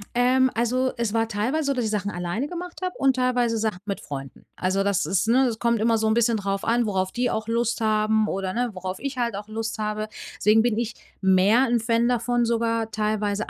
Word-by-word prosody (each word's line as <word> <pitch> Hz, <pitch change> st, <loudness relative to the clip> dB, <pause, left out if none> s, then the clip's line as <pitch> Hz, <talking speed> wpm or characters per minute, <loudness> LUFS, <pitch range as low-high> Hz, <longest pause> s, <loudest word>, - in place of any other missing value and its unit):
Ähm, 255 Hz, +1 st, +3 dB
also, 250 Hz, +3 st, +1 dB
es 235 Hz, -3 st, -1 dB
war 225 Hz, 0 st, +1 dB
teilweise 235 Hz, +9 st, -1 dB
so, 280 Hz, -, +1 dB
dass 250 Hz, -2 st, -1 dB
ich -, -, 0 dB
Sachen 205 Hz, -1 st, -2 dB
alleine 175 Hz, +10 st, -3 dB
gemacht 355 Hz, +1 st, -7 dB
habe 365 Hz, -, -2 dB
und 270 Hz, -1 st, +3 dB
teilweise 245 Hz, -2 st, +1 dB
Sachen 215 Hz, -4 st, -1 dB
mit 200 Hz, -2 st, -3 dB
Freunden. 135 Hz, -2 st, -8 dB
Also 190 Hz, +2 st, 0 dB
das 200 Hz, -6 st, +1 dB
ist, 190 Hz, +4 st, +1 dB
ne 255 Hz, +2 st, +4 dB
es 225 Hz, -2 st, -2 dB
kommt 235 Hz, -2 st, +1 dB
immer 225 Hz, 0 st, +3 dB
so 220 Hz, 0 st, 0 dB
'n 220 Hz, -, +3 dB
bisschen 230 Hz, -1 st, +2 dB
drauf 195 Hz, -1 st, -2 dB
an, 235 Hz, +1 st, +2 dB
worauf 190 Hz, -2 st, -1 dB
die 245 Hz, 0 st, 0 dB
auch 220 Hz, 0 st, -3 dB
Lust 235 Hz, 0 st, 0 dB
haben 215 Hz, 0 st, +2 dB
oder, 190 Hz, -1 st, -2 dB
ne, 245 Hz, 0 st, 0 dB
worauf 185 Hz, 0 st, -5 dB
ich 275 Hz, -1 st, -4 dB
halt 235 Hz, -4 st, -1 dB
auch 205 Hz, +1 st, -6 dB
Lust 225 Hz, +1 st, -4 dB
habe. 215 Hz, 0 st, -2 dB, 0.3 s
Deswegen 215 Hz, +1 st, +4 dB
bin 230 Hz, -2 st, +1 dB
ich 235 Hz, -1 st, -2 dB, 0.3 s
mehr 195 Hz, +7 st, +4 dB
'n 235 Hz, 0 st, +2 dB
Fan 230 Hz, +1 st, +1 dB
davon 240 Hz, 0 st, +1 dB
sogar 230 Hz, -1 st, 0 dB
teilweise 215 Hz, -1 st, -1 dB
225 Hz, 225 wpm, -24 LUFS, 210-240 Hz, 0.3 s, ne